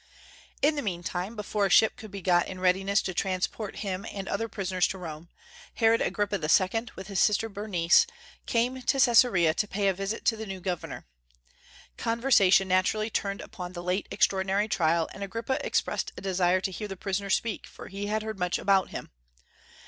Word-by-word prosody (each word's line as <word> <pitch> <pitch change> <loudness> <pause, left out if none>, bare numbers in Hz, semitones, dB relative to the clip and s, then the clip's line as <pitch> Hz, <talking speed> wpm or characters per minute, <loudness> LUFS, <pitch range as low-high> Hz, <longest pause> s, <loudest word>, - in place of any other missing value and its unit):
In 300 +2 +5
the 290 - -1
meantime, 180 +1 -3
before 210 -1 -1
a - - -6
ship 220 +4 +5
could 215 - -10
be 200 -2 -8
got 175 -1 +3
in 185 - -7
readiness 190 +2 +2
to 185 - -3
transport 190 +3 -2
him 190 0 -3
and 195 -1 -6
other 225 0 -2
prisoners 185 -3 0
to 190 - -5
Rome, 165 -2 -8 0.5
Herod 225 0 +3
Agrippa 205 -1 0
II., 185 +9 +2
with 190 - -8
his 195 -1 -2
sister 215 +1 +3
Bernice, 200 - +3 0.4
came 245 +2 0
to 270 +2 +1
Caesarea 225 -10 +5
to 210 - -1
pay 200 0 -1
a - - +1
visit 195 +4 -4
to 225 - +3
the 220 0 -7
new 190 -1 -6
governor. 180 -2 -5 0.9
Conversation 230 -5 +3
naturally 195 +4 +1
turned 200 -1 -2
upon 180 -3 -8
the 175 -1 -6
late 180 +3 -1
extraordinary 195 +1 +1
trial, 165 -4 +1
and 200 - -10
Agrippa 230 +6 -3
expressed - - -1
a - - -7
desire 185 -1 +1
to 190 - -2
hear 210 +3 -5
the 195 -1 -7
prisoner 200 +1 -3
speak, 215 +2 -1
for - - -11
he 200 +1 -5
had 215 +1 -1
heard 220 -2 -5
much 180 -1 0
about 195 -1 +2
him. - - -7
195 Hz, 185 wpm, -28 LUFS, 185-215 Hz, 0.9 s, In